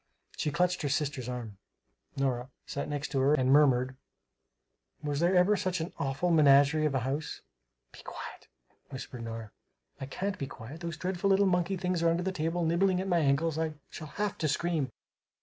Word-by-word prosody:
She - - -1
clutched 180 +4 +1
her 145 - -1
sister's 135 -3 -1
arm 115 -5 -6 0.6
Nora 130 -2 -1 0.2
sat 140 - -4
next 145 0 -3
to 135 - 0
her 140 +3 +4
and 130 -2 +2
murmured, 130 -3 +4 1.1
"Was 145 -1 -1
there 175 +3 +3
ever 180 +4 +5
such 185 -3 -1
an 160 +3 -4
awful 140 +6 0
menagerie 150 0 +5
of 140 - -2
a 130 - +1
house?" 140 +5 -3 0.5
"Be - - -13
quiet," - - -9 0.4
whispered 130 -3 -7
Nora. 115 -2 -6 0.5
"I 135 - -5
can't 195 +8 -3
be 140 - -3
quiet! 130 +6 -9
Those 170 -1 -5
dreadful 185 +2 -1
little 195 +1 +5
monkey 185 +1 +1
things 180 -1 -1
are 170 - +4
under 170 +2 +1
the 190 - -1
table, 165 0 -1
nibbling 180 +3 +2
at 190 - -2
my 175 -2 +3
ankles, 155 +2 +1
I 160 -1 -1 0.2
shall 155 - -7
have 205 +7 -3
to 155 - +1
scream!" 155 -1 0
155 Hz, 185 wpm, -30 LUFS, 135-175 Hz, 1.1 s, ever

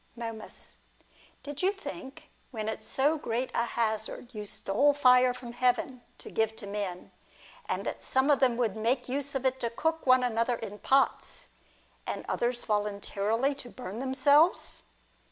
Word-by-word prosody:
Momus. 225 -2 -7 0.7
Did 290 0 -6
you 375 +1 +3
think, 320 -7 -9 0.2
when 220 -3 -4
at 220 - -4
so 295 +4 +1
great 245 -1 -2
a 235 - +1
hazard 225 +2 -2
you 210 -1 -5
stole 215 +8 +2
fire 250 -2 +6
from 245 -1 -8
heaven 250 +1 +1 0.2
to - - -10
give 220 0 0
to 215 - -9
men, 200 -3 -4 0.6
that - - -3
some 265 +3 +2
of 280 - +4
them 250 -3 +3
would 230 -5 0
make 230 +4 0
use 280 +2 -1
of 270 0 -2
it 260 0 +1
to 235 -2 -1
cook 320 +6 -2
one 255 0 +6
another 235 0 +1
in 210 -3 -7
pots, 270 0 +1 0.6
and - - -3
others 240 0 0
voluntarily 210 +4 0
to 275 -3 -8
burn 225 -4 -7
themselves 285 +5 +3
245 Hz, 155 wpm, -29 LUFS, 220-270 Hz, 0.7 s, fire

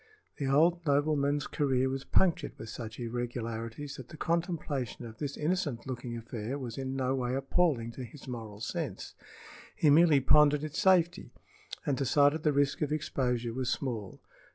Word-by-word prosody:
The 140 - -2
old 165 +5 +3
nobleman's 145 -1 +2
career 130 -4 +1
was 135 +1 -3
punctured 185 -3 +2
with 110 - -8
such 110 -1 -7
irregularities 120 +2 -4
that 125 -2 -10
the 155 - -10
contemplation 160 -8 -2
of 110 -1 -10
this 140 -2 -4
innocent 155 -6 -1
looking 125 -2 -5
affair 115 +2 -5
was 125 -5 -6
in 135 0 -4
no 130 -1 0
way 125 -1 -1
appalling 135 -3 +1
to 130 - -7
his 130 +4 -11
moral 110 -4 -7
sense. - - -4 0.6
He 150 - +4
merely 155 -1 +6
pondered 150 +2 +5
its 155 0 -4
safety, 175 -2 +3 0.5
and 140 - +1
decided 145 +3 +3
the 155 - +3
risk 140 +1 +1
of 150 -1 0
exposure 125 -6 -1
was 130 0 -2
small. 115 -8 -3
135 Hz, 160 wpm, -30 LUFS, 120-150 Hz, 0.6 s, merely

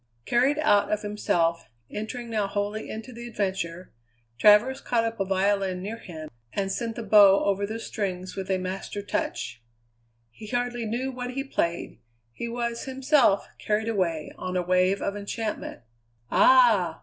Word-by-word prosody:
Carried 260 +5 +2
out 205 -9 +3
of 210 0 0
himself, 170 -5 0 0.2
entering 235 +3 -5
now 210 -3 0
wholly 205 +2 -3
into 225 +4 -7
the 235 +1 -8
adventure, 190 -5 -3 0.5
Travers 225 +6 +5
caught 235 -2 +1
up 230 -1 -3
a 195 - +1
violin 190 -1 0
near 220 +4 -5
him 160 -6 -8 0.3
and 195 -1 -1
sent 230 +2 -3
the 235 - -5
bow 200 -2 +7
over 200 0 +1
the 220 +2 -5
strings 185 -5 -4
with 190 -1 -5
a 190 - +2
master 190 +2 -5
touch. 205 - -3 0.7
He 215 - -11
hardly 245 -1 -2
knew 250 +4 -2
what 250 0 -5
he 275 - -1
played; 170 -11 -2 0.3
he 235 - -5
was 235 0 -3
himself, 265 -5 +3
carried 215 +1 0
away 170 -8 -1
on 185 0 -3
a 180 - 0
wave 185 +2 +2
of 200 - -2
enchantment. 210 - -4 0.5
"Ah!" 220 -10 +5
210 Hz, 160 wpm, -26 LUFS, 190-235 Hz, 0.7 s, bow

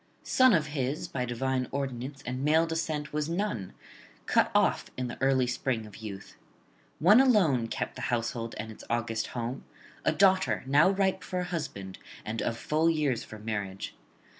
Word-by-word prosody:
Son 255 -1 +5
of 165 -7 +3
his, 135 +1 -2
by 125 -2 -2
divine 130 +1 -1
ordinance, 135 0 -4
and 130 +2 -3
male 160 +3 +4
descent 160 -3 -3
was 150 +1 -1
none, 170 - -2 0.5
cut - - +3
off - - +2
in 130 - -1
the 120 - -8
early 135 -1 +3
spring 125 -2 -1
of 105 -2 -12
youth. 100 -3 -8 0.6
One 205 +10 +7
alone 175 - +4
kept - - -4
the - - -6
household 115 -1 -2
and 110 +1 -5
its 110 - -12
august 115 -1 -1
home, 120 +3 -3 0.4
a - - +3
daughter 185 - +3
now 145 +6 +5
ripe 195 -1 +1
for 180 0 -2
a - - -2
husband 135 - -5 0.3
and 110 +1 -3
of 115 - -1
full 155 +5 +1
years 145 -7 +1
for 110 - -10
marriage. 105 -3 -4
130 Hz, 170 wpm, -29 LUFS, 115-160 Hz, 0.6 s, One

